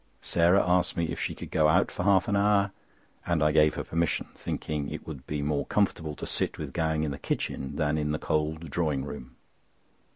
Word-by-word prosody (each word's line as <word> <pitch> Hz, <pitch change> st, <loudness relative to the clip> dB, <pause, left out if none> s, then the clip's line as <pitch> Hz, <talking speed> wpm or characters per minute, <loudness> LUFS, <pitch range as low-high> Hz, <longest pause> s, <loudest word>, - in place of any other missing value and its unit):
Sarah 85 Hz, +3 st, +3 dB
asked 90 Hz, 0 st, +2 dB
me 85 Hz, -1 st, 0 dB
if -, -, -4 dB
she -, -, -2 dB
could -, -, -9 dB
go 80 Hz, -1 st, +4 dB
out 90 Hz, +5 st, +3 dB
for -, -, -4 dB
half 95 Hz, -2 st, +4 dB
an 100 Hz, -, +1 dB
hour, 100 Hz, 0 st, +3 dB, 0.5 s
and 85 Hz, -3 st, +1 dB
I 75 Hz, -, +4 dB
gave 75 Hz, 0 st, +4 dB
her -, -, -3 dB
permission, 85 Hz, 0 st, -1 dB
thinking 75 Hz, -2 st, -3 dB
it -, -, -7 dB
would 70 Hz, -5 st, -8 dB
be 75 Hz, -1 st, -2 dB
more 75 Hz, 0 st, -1 dB
comfortable 80 Hz, -7 st, 0 dB
to -, -, -6 dB
sit -, -, -2 dB
with -, -, -6 dB
Gowing 80 Hz, -1 st, 0 dB
in 75 Hz, -, -1 dB
the 70 Hz, -, -6 dB
kitchen 65 Hz, -, -3 dB
than 75 Hz, 0 st, +1 dB
in 75 Hz, 0 st, -1 dB
the 75 Hz, -, 0 dB
cold 80 Hz, 0 st, -2 dB
drawing 75 Hz, -5 st, 0 dB
room. 70 Hz, -3 st, -8 dB
80 Hz, 215 wpm, -28 LUFS, 75-85 Hz, 0.5 s, go